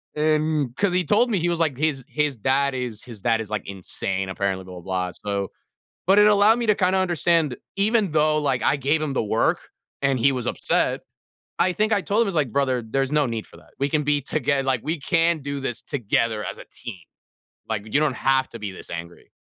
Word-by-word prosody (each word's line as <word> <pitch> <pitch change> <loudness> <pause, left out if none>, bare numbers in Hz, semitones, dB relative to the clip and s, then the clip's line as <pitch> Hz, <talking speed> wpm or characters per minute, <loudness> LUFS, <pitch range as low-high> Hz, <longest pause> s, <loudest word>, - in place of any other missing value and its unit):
and 155 -3 +1
'cause 200 0 +1
he 180 - +2
told 225 - +3
me 200 - +2
he 175 +1 0
was 170 - -1
like, 155 -5 +1
his 140 -2 -1
his 150 -3 0
dad 135 +4 +1
is 125 -4 -4
his 115 -5 -10
dad 115 +1 +2
is, 105 - -8
like, 105 -2 -4
insane, 95 0 -2
apparently, 95 -1 -2
blah, 90 0 -10
blah, 90 - -9
blah, 90 0 -2
so 100 0 -3 0.6
but 195 +2 +5
it 210 - +7
allowed 210 +2 +5
me 235 - -1
to 210 - +4
kinda 185 0 +2
understand 170 -6 +1 0.2
even 205 -1 +2
though, 155 0 +3
like, 140 -4 0
I - - +3
gave 145 +3 +1
him 150 -3 -2
the 115 - 0
work 110 +2 +1 0.4
and 135 -2 +2
he 140 +4 +4
was 125 -3 -3
upset - - 0 0.6
I 180 - +3
think 215 +4 0
I 205 - +3
told 205 +4 +1
him, - - +1
I 195 - 0
was - - -7
like, 150 -6 +1
"Brother, 130 0 +1
there's 135 +5 -1
no 150 -2 +3
need 115 -2 -4
for - - -16
that. - - -21
We 140 - +1
can 150 +1 +1
be 145 0 +1
toge 140 0 0
like, 130 -3 +1
we 155 +3 -2
can 165 +1 +2
do 140 0 -4
this 120 -4 -3
together 115 -4 -1
as - - -5
a - - -10
team. 120 -5 -7 0.7
Like, 110 0 -4
you 145 - +5
don't 150 -3 +2
have 130 0 +2
to 115 - -8
be 105 -2 -4
this 95 - -10
angry." 85 0 -8
140 Hz, 235 wpm, -23 LUFS, 115-165 Hz, 0.7 s, it